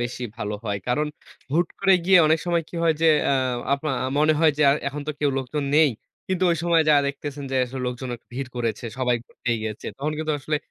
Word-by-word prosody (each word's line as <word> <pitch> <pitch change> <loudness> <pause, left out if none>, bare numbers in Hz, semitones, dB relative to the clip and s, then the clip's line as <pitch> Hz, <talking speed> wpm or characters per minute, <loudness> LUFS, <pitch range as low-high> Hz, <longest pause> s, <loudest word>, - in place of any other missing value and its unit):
বেশি 120 +1 -4
ভালো 105 -2 -3
হয়। 100 -1 -2
কারণ, 150 +5 +1 0.5
হুট 170 +2 +2
করে 195 0 +4
গিয়ে 185 0 +6
অনেক 160 +1 +3
সময় 170 -1 +1
কি - - -14
হয় 165 -1 +3
যে, - - +5 0.2
আ - - +3 0.4
আপনা 145 +1 -3 0.3
মনে 155 +1 +4
হয় 160 -2 +6
যে, - - +4
আর 140 - +3
এখন 145 +1 -6
তো - - +2
কেউ 145 -1 +2
লোকজন 135 +3 -3
নেই। 155 -2 +6 0.4
কিন্তু 185 0 +1
ওই - - -1
সময় 170 -1 +4
যায়া 145 -2 +5
দেখতেছেন 140 0 -6
যে, 135 - 0
আসলে 130 +1 -6
লোকজন 125 +1 -4
আক - - -28
ভিড় 130 +1 -4
করেছে, 115 -1 -2
সবাই 125 -2 +2
উব - - -25
য়ে 120 -2 +1
গেছে। 110 -1 -5
তখন 145 +3 -2
কিন্তু 155 0 -1
আসলে 150 +3 -1
145 Hz, 230 wpm, -24 LUFS, 125-160 Hz, 0.5 s, গিয়ে